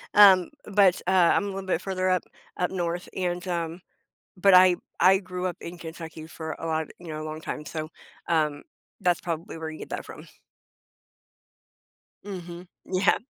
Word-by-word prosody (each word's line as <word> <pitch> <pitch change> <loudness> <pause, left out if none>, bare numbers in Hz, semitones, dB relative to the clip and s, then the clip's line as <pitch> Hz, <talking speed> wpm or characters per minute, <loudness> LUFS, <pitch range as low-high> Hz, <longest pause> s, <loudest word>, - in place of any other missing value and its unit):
Um, 190 -4 +8 0.2
but, 200 -3 +4
uh, - - +3
I'm 180 -1 +5
a - - -3
little 195 -1 -5
bit 180 - +1
further 185 -1 -1
up, 185 -1 +2 0.3
up 180 - 0
north, 175 -1 -2
and, 180 -1 -2
um, 170 0 -3 0.6
but 195 +1 +5
I 180 0 +8 0.2
I 190 +1 +6
grew 180 -1 -5
up 175 - -4
in 175 +1 -7
Kentucky 165 -1 -8
for 160 0 -6
a - - -5
lot, 160 -1 -1
you 175 - -11
know, 155 0 -4
long 155 0 -6
time, 150 - -5
so, 155 +1 -5 0.4
um, 155 -3 +1 0.4
that's 180 -2 +2
probably 165 -1 -4
where 160 0 -4
you 155 - -8
get - - -8
that - - -4
from. - - -11 2.0
Mhm. 180 -2 -7 0.2
Yeah. 190 +1 +3
175 Hz, 170 wpm, -26 LUFS, 160-185 Hz, 2.0 s, Um